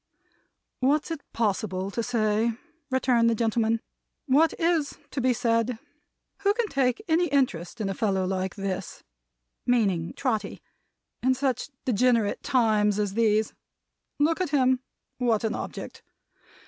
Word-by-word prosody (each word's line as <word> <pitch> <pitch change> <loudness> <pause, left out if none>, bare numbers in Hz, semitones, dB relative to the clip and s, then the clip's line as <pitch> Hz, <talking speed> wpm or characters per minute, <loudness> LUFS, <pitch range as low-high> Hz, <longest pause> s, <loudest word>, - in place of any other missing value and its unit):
"What's 290 +5 +1
it 320 -3 -4
possible 195 -3 -1
to 235 - -2
say?" 225 -1 +1 0.4
returned 250 -3 +3
the 230 - +2
gentleman. 225 0 +1 0.4
"What 300 +4 +3
is 330 -4 +1
to 270 - -2
be 255 +1 +3
said? 230 -1 +1 0.6
Who 400 +1 +2
can 475 -2 0
take 260 - +1
any 340 +2 +3
interest 250 - 0
in 210 - -1
a 195 - -1
fellow 195 -3 0
like 185 0 -2
this," 195 -2 -4 0.6
meaning 195 -9 +1
Trotty, 235 -6 -2 0.6
"in 260 +1 +3
such 265 +1 -1 0.2
degenerate 235 -2 +2
times 215 -5 +2
as 205 -2 -1
these? 220 -1 +2 0.6
Look 320 +5 +2
at 365 - 0
him! 260 -3 +3 0.4
What 235 -4 +1
an 220 0 0
object! - - -6
235 Hz, 135 wpm, -26 LUFS, 210-265 Hz, 0.6 s, returned